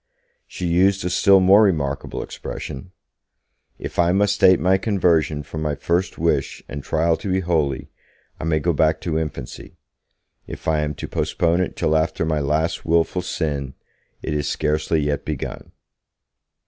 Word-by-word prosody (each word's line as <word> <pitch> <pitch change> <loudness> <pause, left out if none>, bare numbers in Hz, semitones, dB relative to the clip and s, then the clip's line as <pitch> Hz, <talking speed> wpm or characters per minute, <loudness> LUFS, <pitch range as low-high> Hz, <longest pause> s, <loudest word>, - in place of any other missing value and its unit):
She 90 - -6
used 95 +2 +2
a 90 - -1
still 100 +1 +5
more 95 +3 +6
remarkable 75 -9 0
expression: 90 +7 -7 0.9
'If - - -6
I 85 0 +4
must 100 +2 +1
date 95 -2 +6
my 95 +1 +3
conversion 85 -8 +1
from 80 +2 -7
my 75 -2 -1
first 85 +5 -1
wish - - -1
and 70 - -6
trial 80 +3 +1
to 100 - -4
be 95 +1 +1
holy, 75 -7 -1 0.5
I - - -4
may 80 -1 +1
go 85 +2 0
back 80 +1 +2
to 80 -2 -1
infancy; 75 -6 -7 0.7
if - - -9
I 80 -1 +2
am 75 -1 -2
to - - -6
postpone 85 +1 0
it 90 - -2
till 80 - +1
after 80 +1 0
my 80 -1 0
last 75 +3 -1
wilful 85 +2 +1
sin, 70 -7 -3 0.5
it 80 - -2
is 75 -1 -1
scarcely 75 +1 0
yet 75 0 -1
begun.' 75 -5 -5
80 Hz, 160 wpm, -22 LUFS, 75-90 Hz, 0.9 s, more